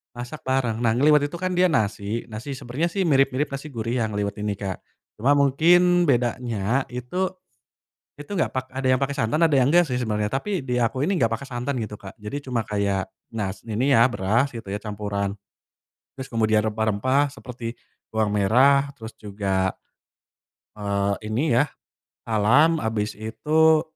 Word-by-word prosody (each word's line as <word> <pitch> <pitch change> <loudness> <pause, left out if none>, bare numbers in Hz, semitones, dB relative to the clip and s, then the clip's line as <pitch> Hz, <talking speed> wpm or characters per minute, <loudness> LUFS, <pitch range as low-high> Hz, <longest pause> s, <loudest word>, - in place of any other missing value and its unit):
Masak 125 +4 -8
bareng 130 -4 0
nah 115 -1 +2
ngeliwet 145 +3 +4
itu 145 - -11
kan 185 +2 -2
dia 185 - +6
nasi 110 - -1
nasi 120 +6 -6
sebenernya 135 +5 -2
sih 195 +3 -1
mirip-mirip 135 -3 +2
nasi 140 +2 -6
gurih 120 -3 -3
yang 110 -2 -1
ngeliwet 100 0 -2
ini 105 0 -2
Kak, 95 -1 -5 0.4
cuma 135 +6 +4
mungkin 175 +5 +4
bedanya 120 -2 0
itu, 175 +10 -3 0.8
itu 145 - -11
gak 175 - 0
pak 130 0 -3
ada 135 0 -2
yang 130 - +4
pake 140 +1 -1
santan 135 +1 0
ada 155 - +1
yang 135 0 +4
gak 175 0 +5
sih 125 - -3
sebenernya 105 -2 -1
tapi 140 - -2
di 125 - -1
aku 130 +5 0
ini 195 - +1
gak 115 -11 +2
pake 115 +4 -4
santan 125 +1 -3
gitu 110 -2 -4
Kak 100 +2 -11
jadi 125 +8 -6
cuma 120 -5 -2
kayak, 100 -2 -1 0.2
nas 105 -3 -4
ini 130 +6 +2
ya 115 - +6
beras 115 +7 +1
gitu 115 -4 -9
ya 100 +2 -4
campuran, 100 -1 -3 0.7
terus 130 -1 -8
kemudian 110 -1 +2
rempah-rempah 110 +7 +1
seperti 120 -4 -7 0.4
bawang 105 -1 0
merah 135 +7 +4
terus 110 -4 -10
juga, 100 -3 -1 1.1
eee, 100 +1 -1
ini 120 +2 +2
ya, 145 - +2 0.5
salam 125 +10 +3
abis 110 -6 -2
itu, 155 +9 +3
120 Hz, 170 wpm, -24 LUFS, 105-140 Hz, 1.1 s, dia